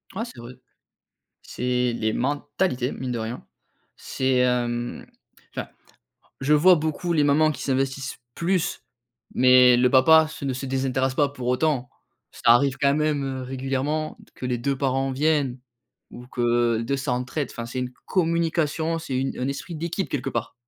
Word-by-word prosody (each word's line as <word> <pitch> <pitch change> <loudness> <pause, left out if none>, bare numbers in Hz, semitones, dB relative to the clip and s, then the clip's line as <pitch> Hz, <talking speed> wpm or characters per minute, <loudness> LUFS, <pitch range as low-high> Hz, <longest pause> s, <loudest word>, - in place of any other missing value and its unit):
Ouais, 225 - -2
c'est 180 - -12
vrai. 120 +2 -9 0.9
C'est 125 -1 -1
les 110 -1 -1
mentalités, 145 0 -1
mine 130 -1 -5
de 120 - -2
rien. 115 +2 -5 0.5
C'est, 130 -1 -1
hem, 120 -1 -1 0.5
enfin, - - -4 0.7
je 140 +3 +1
vois 175 +5 +7
beaucoup 160 +3 -2
les 150 -3 +3
mamans 155 +2 +4
qui - - -8
s'investissent 135 -1 -2 0.2
plus, 180 0 -1 0.5
mais 125 -1 +6
le 125 +1 +4
papa, 155 +4 +6
se 150 - -8
ne 135 - -1
se 130 +2 -5
désintéresse 130 0 0
pas 145 0 +2
pour 125 -3 -5
autant. 130 -1 +1 0.4
Ça - - +1
arrive 135 +2 +3
quand 140 0 +3
même, 150 -2 0
heu, 130 -1 -4
régulièrement, 135 +4 -2
de - - -20
que - - -9
les 125 -1 -1
2 135 +3 -1
parents 135 0 0
viennent 140 -2 +1 0.5
ou 125 0 -11
que, 120 -2 +1
2 140 +4 -1
s'entraident, 130 +1 -2
enfin 115 - -6
c'est 120 +2 -5
une 125 0 -3
co - - -34 0.2
communication, 165 -1 0
c'est 150 -5 -4
une 135 +1 -2
un 130 +2 -1
esprit 150 +5 -5
d'équipe 170 +4 -3
quelque 135 -4 -2
part. 115 -1 -3
135 Hz, 170 wpm, -24 LUFS, 125-150 Hz, 0.9 s, vois